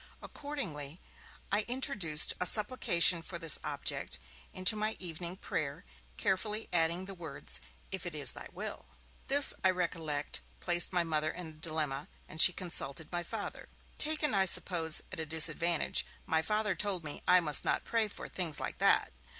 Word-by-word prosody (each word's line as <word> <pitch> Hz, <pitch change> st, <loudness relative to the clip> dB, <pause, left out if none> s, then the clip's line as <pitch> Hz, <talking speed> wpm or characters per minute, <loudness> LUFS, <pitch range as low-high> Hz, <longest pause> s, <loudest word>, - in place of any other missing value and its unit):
Accordingly, 170 Hz, -, -7 dB, 0.5 s
I 205 Hz, +2 st, +1 dB
introduced 240 Hz, -, +3 dB
a 180 Hz, -, +4 dB
supplication 180 Hz, -6 st, +3 dB
for 170 Hz, +1 st, -7 dB
this 165 Hz, -3 st, +5 dB
object -, -, -4 dB, 0.3 s
into 185 Hz, +4 st, +2 dB
my 215 Hz, +1 st, -2 dB
evening 175 Hz, 0 st, -7 dB
prayer, 140 Hz, -, -5 dB, 0.3 s
carefully 210 Hz, +3 st, -2 dB
adding 170 Hz, +2 st, +1 dB
the 195 Hz, -, -8 dB
words: 140 Hz, -, -7 dB, 0.3 s
'If 190 Hz, -2 st, -4 dB
it 170 Hz, -, -6 dB
is 145 Hz, -2 st, +2 dB
Thy -, -, -10 dB
will.' -, -, -8 dB, 0.4 s
This, 285 Hz, +1 st, +10 dB
I 190 Hz, -, +4 dB
recollect, 165 Hz, -5 st, -3 dB, 0.2 s
placed 175 Hz, -1 st, +2 dB
my 180 Hz, -2 st, 0 dB
Mother 155 Hz, -2 st, -2 dB
in 180 Hz, +2 st, -7 dB
a -, -, -11 dB
dilemma, 155 Hz, -3 st, -3 dB, 0.2 s
and 160 Hz, -, -1 dB
she -, -, +8 dB
consulted 165 Hz, -4 st, -2 dB
my 175 Hz, -1 st, -3 dB
Father. 170 Hz, -, -8 dB, 0.3 s
Taken, 305 Hz, -3 st, +1 dB
I 195 Hz, -1 st, +3 dB
suppose, 165 Hz, -3 st, +2 dB
at 185 Hz, -, -7 dB
a 160 Hz, -, -4 dB
disadvantage, 160 Hz, +1 st, +3 dB, 0.2 s
my 160 Hz, 0 st, 0 dB
Father 210 Hz, +2 st, -1 dB
told 185 Hz, -1 st, -1 dB
me 150 Hz, -1 st, -7 dB
I 180 Hz, -, +5 dB
must 150 Hz, -4 st, +4 dB
not -, -, -1 dB
pray 225 Hz, -2 st, -1 dB
for 205 Hz, -, -10 dB
'things 165 Hz, -5 st, -3 dB
like -, -, -6 dB
that'. -, -, +2 dB
175 Hz, 165 wpm, -30 LUFS, 155-195 Hz, 0.5 s, This